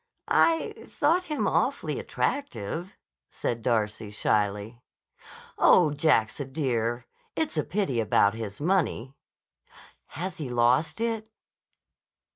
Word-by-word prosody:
"I 330 -1 +3
thought 345 +4 +1
him 300 -3 -2
awfully - - 0
attractive," 175 - -3 0.3
said 115 -1 -3
Darcy 110 -2 -1
shyly. 105 +2 -1 0.8
"Oh, 165 -5 +6
Jack's 145 -7 +2
a 140 - -3
dear. 120 -4 -1 0.3
It's 315 -1 -1
a - - +1
pity 185 - -1
about 100 -2 +3
his 110 -3 -6
money." 155 -6 0 1.0
"Has 180 +1 -4
he 145 -5 -4
lost 125 - +2
it?" 225 -1 -2
130 Hz, 105 wpm, -27 LUFS, 110-190 Hz, 1.0 s, Oh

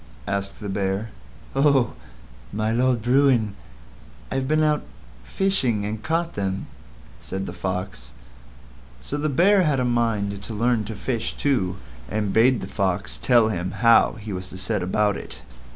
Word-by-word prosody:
asked 100 0 -3
the 105 - -6
Bear. 100 +2 -2 0.4
"Oh! 135 -4 +3 0.6
My 110 +1 -1
Lord 120 -1 +2
Bruin, 125 -4 +3 0.8
I've 130 0 -1
been 155 +1 +3
out 150 -1 +2 0.4
fishing 125 - 0
and 105 +1 -4
caught 165 +4 -1
them," 95 -1 -2 0.5
said 95 +10 -4
the 85 - -6
Fox. 90 -10 -4 0.9
So 100 - -5
the 150 +1 0
Bear 185 +8 +4
had 150 -6 +2
a 125 - +1
mind 110 -5 0
to 110 +2 -6
learn 115 0 +1
to 110 +1 -6
fish 115 +2 -2
too, 115 -11 0 0.3
and 105 -1 -1
bade 120 +2 +4
the - - -5
Fox 100 0 -2
tell 120 -3 +4
him 90 -3 -2 0.2
how 115 - +6
he 110 -3 -7
was 90 0 -5
to 95 - -9
set 100 +2 -1
about 105 +3 +1
it. - - -9
110 Hz, 155 wpm, -24 LUFS, 100-130 Hz, 0.9 s, how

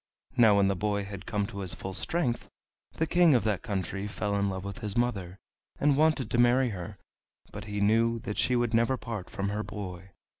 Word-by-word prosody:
Now 115 -5 +6
when 100 -1 +4
the 100 - +1
boy 100 +1 -1
had 100 -1 -8
come 105 -1 0
to 100 -1 -7
his 95 -3 -3
full 95 - -6
strength 125 - -1 0.4
the 160 - 0
King 170 -2 +5
of 120 - +3
that 105 -4 0
country 100 -2 -3
fell 105 0 -2
in 100 0 +1
love 95 -1 -4
with 100 -1 -6
his 105 0 -4
mother, 100 -7 -1 0.4
and 145 -1 +3
wanted 155 -5 +2
to 120 - +1
marry 125 +1 +4
her, 95 0 -6 0.5
but 105 0 -7
he 105 -1 -3
knew 115 +3 +3
that 105 - -4
she 125 - +2
would 120 -1 +1
never 115 +3 +3
part 115 -6 -6
from 100 0 -3
her 105 +1 -2
boy. 95 -3 -7
105 Hz, 215 wpm, -29 LUFS, 100-120 Hz, 0.5 s, Now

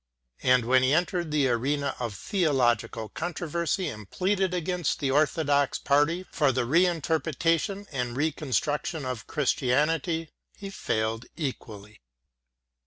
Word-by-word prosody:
And 125 -2 +4
when 130 +2 +4
he 130 +3 +3
entered 175 0 0
the 150 -3 +2
arena 140 +4 0
of 115 -5 -3
theological 125 - 0
controversy 170 +2 -2
and 105 -7 -7
pleaded 190 0 0
against 180 -2 -1
the 140 -3 0
Orthodox 145 -1 +2
party 155 +6 +2
for 145 -4 +2
the 130 -1 0
re 170 +9 +4
interpretation 165 +3 0
and 125 -3 -3
reconstruction 150 0 -1
of 125 -5 -5
Christianity 150 +4 0 0.3
he 195 -1 -7
failed 110 - -2
equally. 110 - -6
145 Hz, 120 wpm, -27 LUFS, 125-170 Hz, 0.3 s, And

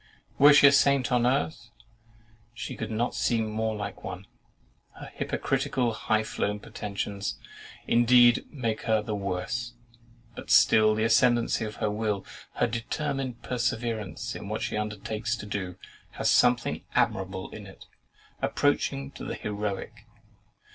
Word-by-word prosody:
Were 145 +2 +9
she 145 0 +7
a 140 - +9
saint 140 -2 +3
on 120 -1 +3
earth, 135 -1 -1 0.9
she 110 0 -6
could - - -5
not 115 +2 -1
seem 115 -2 0
more 110 0 -1
like 105 -2 -6
one. 95 +1 -7 0.7
Her - - -10
hypocritical 120 -3 -1
high 110 0 0
flown 105 -1 -2
pretensions, 100 -1 -4 0.5
indeed, 120 +1 +5
make 115 -6 -2
her 110 -1 +3
the 110 - -4
worse: 100 +5 -3 0.6
but - - -9
still 110 0 +5
the 110 - 0
ascendancy 120 0 +3
of 105 -1 -6
her 105 - -1
will, 105 -2 -2 0.3
her - - +2
determined 130 +1 -3
perseverance 115 -2 -2
in 100 - -7
what 110 - -3
she - - -2
undertakes 105 +2 -3
to 115 - -8
do, 95 -3 -4 0.4
has - - +1
something 120 -1 +2
admirable 95 0 0
in - - -9
it, - - -14 0.6
approaching 70 0 0
to - - -10
the - - -4
heroic. 105 +2 -5
110 Hz, 140 wpm, -27 LUFS, 105-120 Hz, 0.9 s, Were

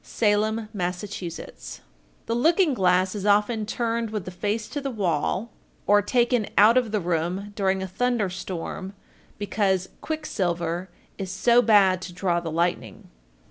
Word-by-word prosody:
Salem, 215 +1 0
Mass. 180 -2 -2
1408. 185 -5 -7 0.5
The 230 - -2
looking 320 +6 +3
glass 185 -3 +2
is 205 -2 -5
often 210 +1 +2
turned 230 0 -1
with 210 -4 -4
the 185 - -6
face 210 +4 -2
to 290 - -4
the 275 - -3
wall, 195 - -1 0.3
or 205 0 +5
taken 240 +1 +1
out 215 +3 +7
of 245 -4 +2
the 215 - +1
room 180 +3 -2
during 190 -1 0
a - - -4
thunder 235 +2 0
storm, 190 +1 -5 0.4
because 195 -2 0
"quick 315 -1 -4
silver 175 - -2 0.3
is 190 -1 -4
so 235 +6 +4
bad 195 -5 +4
to 180 -1 -7
draw 175 -1 0
the 170 -1 -5
lightning." 160 - -2
200 Hz, 155 wpm, -25 LUFS, 180-225 Hz, 0.5 s, out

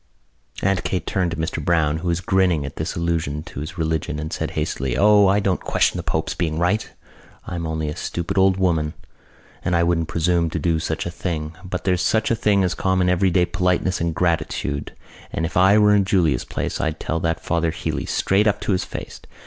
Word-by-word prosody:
Aunt 95 -2 +1
Kate 95 - -2
turned 90 -2 0
to 85 - -4
Mr 80 0 -3
Browne, 80 -2 +2
who 80 - -5
was 85 +1 0
grinning 90 -6 +2
at 70 - -8
this - - -3
allusion 80 -3 -1
to - - -8
his 80 +5 -6
religion, 80 -1 -1
and 75 +1 -5
said - - -2
hastily: 65 -1 -1
"O, 105 +1 +6
I 100 +2 +3
don't 95 -2 0
question - - +1
the - - -2
pope's - - -2
being 80 -3 -2
right. 90 +6 +1 0.6
I'm 85 -2 -4
only 80 -1 -2
a 75 - -4
stupid 85 -1 -3
old 95 -1 +4
woman 80 -5 0 0.7
and 90 - +1
I 85 - +3
wouldn't 85 -1 +1
presume 85 0 +1
to - - -3
do 85 -2 +1
such 80 0 -3
a 85 - -3
thing. 80 -3 -4
But 90 0 -4
there's 90 -2 +1
such 110 +6 +1
a - - +3
thing 105 -3 +2
as 90 - +1
common 95 -1 +1
everyday 90 0 +3
politeness 90 0 0
and 85 -1 -1
gratitude. 75 -3 -1 0.4
And 80 - -1
if 80 - -5
I 95 +3 +6
were 105 -1 +5
in 100 -1 +4
Julia's 95 -6 +1
place - - -3
I'd 80 -1 -2
tell 80 - -2
that 80 0 -1
Father 85 0 0
Healey - - -3
straight 100 +3 +2
up 105 0 +1
to - - -1
his 90 -1 +1
face...." - - -8
85 Hz, 215 wpm, -22 LUFS, 80-95 Hz, 0.7 s, O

